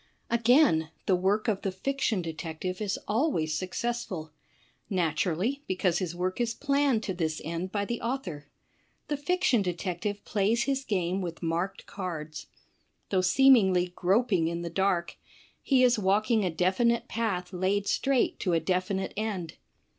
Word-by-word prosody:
Again, 235 - +4 0.2
the 190 - +3
work 195 +4 +1
of 205 -3 0
the 195 - -1
fiction 220 -1 -1
detective 165 +3 -5
is 205 -1 -1
always 210 - +1
success 235 +7 -2
ful. 160 -6 -7 0.6
Naturally, 180 - 0
because 185 -2 +1
his 175 -3 -3
work 185 +5 -2
is 230 -1 0
planned 280 -5 +1
to 190 - -2
this 160 -3 -2
end 170 +3 -3
by 205 -1 -1
the 235 +2 -4
author. 230 - -4 0.6
The 295 - 0
fiction 290 - +2
detective 185 +2 -3
plays 215 +3 +1
his 275 -1 -1
game 185 -2 0
with 170 -1 -6
marked 170 +4 -2
cards. 165 -6 -6 0.6
Though 190 -2 +3
seemingly 190 -5 +4
groping 190 -2 +2
in 170 +1 -3
the 170 - -4
dark, 180 -2 0 0.4
he 260 -2 +3
is 245 -3 +4
walking 210 +3 +2
a 185 - +1
definite 185 +8 +1
path 195 -5 -2
laid 190 +3 0
straight 270 +2 +1
to 180 - 0
a 165 - +3
definite 185 +3 -1
end. 200 -7 -3
190 Hz, 150 wpm, -28 LUFS, 175-230 Hz, 0.6 s, Again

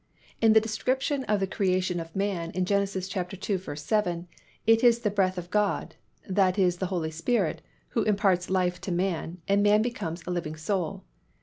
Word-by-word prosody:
In 225 -1 +6
the 220 - +8
description 260 +5 -1
of 210 -1 +1
the - - +3
creation 185 -2 0
of 165 0 -8
man 195 -4 -1
in 185 0 +1
Gen. 200 +1 +2
ii. - - +1
7, 185 -1 -2 0.4
it 225 +2 +4
is 235 -1 +6
the 210 -3 0
breath 190 -2 +1
of 175 0 -6
God, 210 0 0 0.3
that 190 -1 +2
is 180 -3 +3
the 185 - -2
Holy 170 -4 -2
Spirit, 165 +3 0 0.3
who 230 - 0
imparts 195 -4 +2
life 180 -1 0
to 190 - -4
man, 175 -1 -2
and 200 +1 +3
man 210 +1 +4
becomes 175 -9 -4
a 180 - -3
living 165 -3 -3
soul. 185 +3 -2
190 Hz, 180 wpm, -27 LUFS, 175-210 Hz, 0.4 s, the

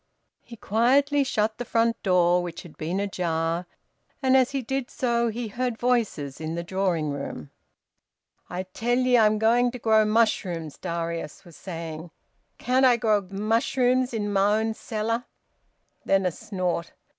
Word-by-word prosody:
He 235 - -12
quietly 275 +7 +2
shut 220 -4 -1
the - - -2
front 230 0 +1
door, 180 -2 +3
which 175 -2 -6
had 170 - -13
been 170 +5 -3
ajar, 170 -3 -1 0.5
and 260 -1 +3
as 260 -2 +4
he 275 -2 -3
did 265 +1 -3
so 235 -2 0
he 230 0 -3
heard 245 +1 -2
voices 220 - -1
in 160 +1 -3
the 170 - -3
drawing 170 -4 -1
room. 140 - -6 1.0
"I 180 +1 -3
tell 230 +6 -1
ye 255 -1 +3
I'm 215 -2 +4
going 235 +3 +3
to 250 - -7
grow 220 -2 +4
mushrooms," 190 -8 0
Darius 170 -2 -4
was 170 -3 -14
saying. 165 -2 -7 0.5
"Can't 255 +2 +1
I 250 -2 +6
grow 215 -3 +2
mushrooms 245 +5 +1
in 205 -3 -2
my 200 +2 +3
own 225 0 -1
cellar?" 230 +2 -3 0.8
Then 195 -1 +2
a 180 - +2
snort. 180 -2 -3
215 Hz, 155 wpm, -25 LUFS, 175-240 Hz, 1.0 s, I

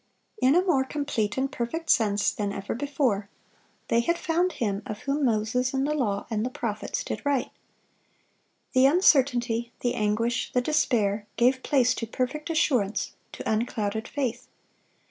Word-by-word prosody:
(581) - - +4
In 315 +6 +5
a - - -8
more 275 -7 +3
complete 265 -7 -2
and 265 +1 0
perfect 320 +8 -2
sense 205 -3 +3
than 205 -1 -3
ever 200 0 -4
before, 250 -6 -1 0.6
they 230 - +3
had 340 +9 +1
"found 350 +3 0
Him, 205 -3 -2
of 210 - -6
whom 285 +1 -1
Moses 240 +3 0
in 265 - +1
the 295 +2 0
law, 210 -9 -1
and 215 -1 0
the 250 - -1
prophets, 220 -4 -3
did - - -4
write." 285 -3 0 1.2
The 260 0 +6
uncertainty, 250 -7 +3
the 245 - 0
anguish, 225 +3 0
the 250 - +3
despair, 220 -8 +1
gave 255 +2 +3
place 255 -4 +3
to 230 - -4
perfect 260 +7 -3
assurance, 260 - +1 0.2
to - - -6
unclouded 220 0 -1
faith. 255 -3 -3
245 Hz, 160 wpm, -26 LUFS, 215-280 Hz, 1.2 s, The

